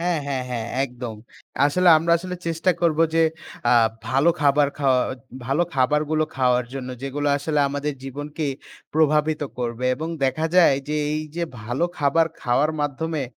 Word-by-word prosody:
হ্যাঁ, 175 -1 0
হ্যাঁ, 135 -2 -2
হ্যাঁ। 115 -2 -3 0.2
একদম। 125 -3 -7 0.5
আসলে, 180 +5 +2
আমরা 170 +1 +1
আসলে 180 +1 -6
চেষ্টা 165 +2 +1
করব 165 -2 +2 0.2
যে, 165 - +4 0.5
আ - - +5 0.4
ভালো 140 +6 +4
খাবার 145 0 +4
খাওয়া 135 -3 +3 0.5
ভালো 135 +7 +2
খাবারগুলো 150 +4 +2
খাওয়ার 125 -1 +2
জন্য, 130 -2 -5
যেগুলো 145 +2 -2
আসলে 150 0 0
আমাদের 145 +1 -2
জীবনকে 145 +3 -5 0.5
প্রভাবিত 155 0 +2 0.2
করবে। 120 0 -3
এবং 155 +5 -5 0.2
দেখা 145 +5 0
যায় 170 -6 +7
যে, 150 - -1 0.2
এই 155 - -1 0.2
যে 175 - -1 0.2
ভালো 120 +9 -1
খাবার 150 +3 +3
খাওয়ার 130 +5 +2
মাধ্যমে, 145 +1 -2
145 Hz, 155 wpm, -23 LUFS, 130-160 Hz, 0.5 s, যায়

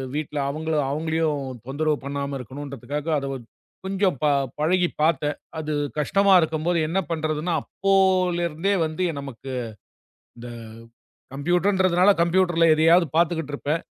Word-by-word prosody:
வீட்டுல 150 -1 -3
அவங்கள 160 +3 -3 0.2
அவங்களையும் 160 0 0 0.3
தொந்தரவு 150 +3 0
பண்ணாம 140 0 -3
இருக்கணும்றதுக்காக 140 +3 -6
அதை 140 - -5 0.6
கொஞ்சம் 190 -4 0
ப - - +3 0.3
பழகிப் 175 +3 +1
பாத்தேன். 150 -2 +1 0.2
அது 155 -1 -3 0.2
கஷ்டமா 195 +6 +3
இருக்கும்போது 160 +2 0
என்ன 175 +5 0
பண்றதுன்னா, 155 +1 -1
அப்போல 190 -2 +2
இருந்தே 170 +5 -1
வந்து 160 +3 -1
நமக்கு 135 -1 -8 0.9
இந்த 120 +1 -9 0.9
கம்ப்யூட்டர்ன்றதுனால, 180 +5 +2
கம்ப்யூட்டர்ல 170 -1 +3
எதையாவது 165 +3 +5
பார்த்துக்கிட்டு 160 -3 +1
இருப்பேன். 150 +3 -2
160 Hz, 110 wpm, -24 LUFS, 145-180 Hz, 0.9 s, எதையாவது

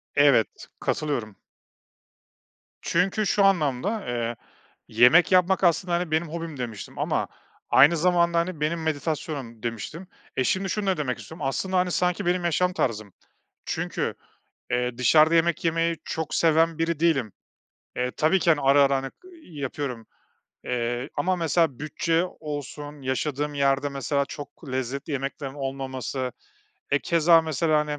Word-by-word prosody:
Evet, 140 -6 +3
katılıyorum. 120 -9 -2 1.5
Çünkü 190 +5 +1
şu 200 +1 +2
anlamda, 190 - +1
eee, 120 -1 -2 0.5
yemek 125 - +5
yapmak 185 +1 +3
aslında, 175 +1 +2
hani, 170 -1 -1
benim 160 +2 +1
hobim 165 -2 -6
demiştim 115 -5 -6
ama - - 0 0.4
aynı 150 +6 +6
zamanda, 170 0 +3
hani, 170 -1 -3
benim 160 +2 -1
meditasyonum 145 -6 -3
demiştim. 120 - -5 0.3
E, 130 - +1
şimdi 190 +8 0
şunu 205 +2 -2
da 190 -2 +2
demek 135 -5 -2
istiyorum. 160 -3 -8
Aslında, 185 +7 -1
hani, 180 0 +1
sanki 180 +2 0
benim 175 0 +1
yaşam 180 +2 +1
tarzım. 110 - -2 0.5
Çünkü, - - -2 0.6
eee, 125 -1 -1
dışarıda 155 +6 +5
yemek 170 0 +2
yemeyi 165 0 +1
çok 160 -1 -3
seven 165 0 +3
biri 165 -1 -1
değilim. 145 -10 +2 0.6
E, 125 0 -1
tabii 155 +8 +2
ki, 170 - +2
hani, 155 -3 +3
ara 140 +1 +5
ara, 140 0 +2
hani, 135 0 -4 0.5
yapıyorum, 130 -4 -4 0.6
eee, 120 +1 -2
ama 185 0 0
mesela, 165 -5 +1
bütçe 165 +3 0 0.2
olsun, 145 -1 -6
yaşadığım 145 +2 -2
yerde, 140 0 +2
mesela, 140 +1 -1
çok 145 +2 -10
lezzetli 130 +3 -3
yemeklerin 135 0 -4
olmaması, 135 -2 -4 0.6
e, 140 - +3
keza 165 +1 +4
mesela, 155 0 +1
hani, 150 -1 -3
150 Hz, 140 wpm, -25 LUFS, 135-170 Hz, 1.5 s, aynı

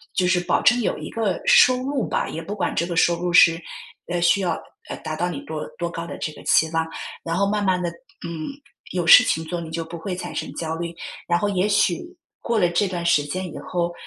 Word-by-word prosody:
就 185 - +2
是 180 0 +3
保 175 - +1
证 245 0 +5
有 - - -1
一 - - -7
个 210 -6 -1
收 255 0 +6
入 270 -3 -1
吧， - - -1
也 165 - -5
不 205 +4 -6
管 200 - -1
这 - - +1
个 170 0 -3
收 170 +1 +2
入 180 0 -1
是， 170 -1 +6 0.5
呃， 175 0 -1
需 175 +3 +3
要， 180 - 0 0.4
呃， - - -5
达 155 - -3
到 175 +3 -1
你 155 -6 -5
多 155 -1 -5
多 175 - -2
高 170 0 -6
的 - - -7
这 155 - -3
个 - - -13
期 160 - +4
望， 160 0 0 0.4
然 165 0 -2
后 200 +2 +2
慢 210 0 0
慢 185 -2 +2
地， 175 -1 -1 0.4
嗯， 160 -2 -5 0.4
有 180 -2 -1
事 210 +8 +9
情 160 -9 -1
做， 175 +1 -4
你 165 - -7
就 165 0 -4
不 165 +1 -8
会 180 +3 -4
产 180 - -6
生 - - -4
焦 160 -1 -3
虑。 170 0 -5 0.3
然 175 - +3
后 205 - 0
也 195 -1 +1
许 195 -4 +2 0.4
过 235 -1 -1
了 180 -4 +4
这 175 +4 +1
段 175 -2 -4
时 160 -4 +3
间 175 +3 -5
以 - - -7
后， 175 -1 -2
175 Hz, 270 characters per minute, -23 LUFS, 165-190 Hz, 0.5 s, 事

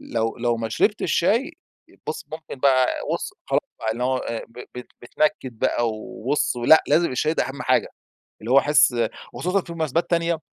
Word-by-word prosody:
لو 115 -1 -2
لو 120 -1 +1
ما 115 0 -3
شربتش 205 - +1
شاي، 235 - +2 0.5
بص - - -4
ممكن 155 -4 -8
بقى 130 -2 +4 0.3
وص - - -3
خلاص - - +2 0.2
بقى، 110 0 -1
إن 120 - -7
هو 130 +1 +1
آآ، 115 -2 -4
ب 115 - -16 0.2
ب - - -5 0.2
بيتنكد 130 -2 -1
بقى 120 0 +1
وبص، 120 +5 -2
لأ، 120 +6 +6
لازم 160 +2 +3
الشاي 155 +5 0
ده - - +1
أهم 135 - -6
حاجة. - - +2 0.5
اللي 115 - -4
هو 135 - +8
أحس 145 -4 +4 0.4
وخصوصًا 185 +2 0
في 170 - -9
مناسبات 160 0 -1
تانية 170 -1 +1
135 Hz, 180 wpm, -23 LUFS, 120-165 Hz, 0.5 s, هو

